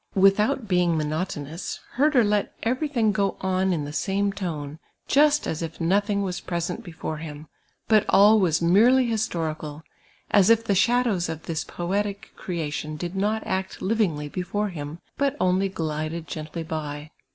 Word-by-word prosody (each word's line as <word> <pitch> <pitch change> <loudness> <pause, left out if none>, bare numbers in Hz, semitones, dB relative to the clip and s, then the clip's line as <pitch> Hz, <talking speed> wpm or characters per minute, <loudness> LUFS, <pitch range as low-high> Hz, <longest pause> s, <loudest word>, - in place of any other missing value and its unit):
Without 210 +6 +3
being 180 -3 +2
monotonous. 155 +1 -3
Herder 275 -2 +3
let 205 -1 0
cvei 250 +3 0
j 310 - 0
thing 235 -7 +2
go 200 0 0
on 190 0 +1
in 155 -5 -1
the 145 - -7
same 200 +3 0
tone, 155 -6 -5 0.3
just 295 +1 +4
as 160 - -3
if 165 0 -5
Dothing 200 +4 +1
was 180 -2 -3
present 175 0 -3
before 160 -2 -5
him, 150 -1 -8 0.4
but 215 -2 +5
all 210 +2 +6
was 170 -3 +2
merely 235 +9 +5
historical; 160 -9 -3 0.5
as 200 -1 +5
if 230 0 +5
the 210 - +1
shadows 215 -3 +2
of 160 -1 -5
this 165 -2 -3
poetic 200 +3 -3
creation 155 -3 -4
did 175 +3 -5
not 210 +3 0
act 190 0 -3
livingly 185 -8 0
before 195 +6 -2
him, 150 -3 -6 0.2
but 280 0 +1
only 185 +1 +2
glided 160 -1 -3
gently 155 +1 -5
by. 155 -1 -5
185 Hz, 160 wpm, -25 LUFS, 160-210 Hz, 0.5 s, all